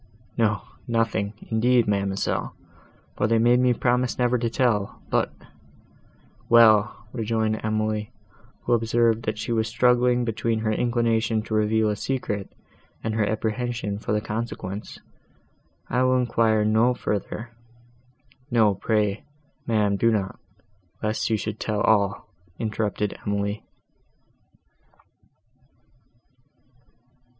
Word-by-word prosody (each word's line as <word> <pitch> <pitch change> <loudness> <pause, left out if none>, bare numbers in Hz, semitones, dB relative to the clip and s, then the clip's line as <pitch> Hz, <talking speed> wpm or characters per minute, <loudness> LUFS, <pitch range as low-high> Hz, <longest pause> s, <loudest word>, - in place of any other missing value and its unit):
"No, 110 -3 +1 0.2
nothing, 115 -3 0 0.2
indeed, 120 +1 +3
ma'amselle, 100 -1 -1 0.6
for - - +1
they 115 0 +3
made 120 +2 +4
me 125 0 +4
promise 125 +1 +1
never 125 0 +2
to 115 0 0
tell:—but—" 115 -4 0 1.2
"Well," 110 -2 +5
rejoined 110 -2 -1
Emily, 110 -1 -1 0.5
who 120 - +1
observed 115 0 +2
that 110 0 -2
she 110 +2 -4
was 110 -1 +1
struggling 125 +1 +3
between 115 0 -1
her 110 -1 0
inclination 115 -1 +1
to 110 - -6
reveal 110 +1 +2
a - - -2
secret, 105 -4 -3 0.5
and 110 - -2
her 110 -1 +1
apprehension 110 -1 -2
for - - -4
the 105 0 +1
consequence, 105 -2 -5 0.9
"I 125 - 0
will 130 0 +3
enquire 115 -3 +2
no 110 +3 +3
further—" 110 +2 -4 1.0
"No, 110 -4 +4
pray, 105 0 0 0.4
ma'am, 105 -3 +2
do 115 - +3
not." 100 -4 -1 0.6
"Lest 110 +2 -1
you 110 - +2
should 110 +1 -5
tell 105 -1 -1
all," 100 -2 +2 0.3
interrupted 105 -2 -2
Emily. 100 +1 -2
110 Hz, 110 wpm, -24 LUFS, 105-120 Hz, 1.2 s, Well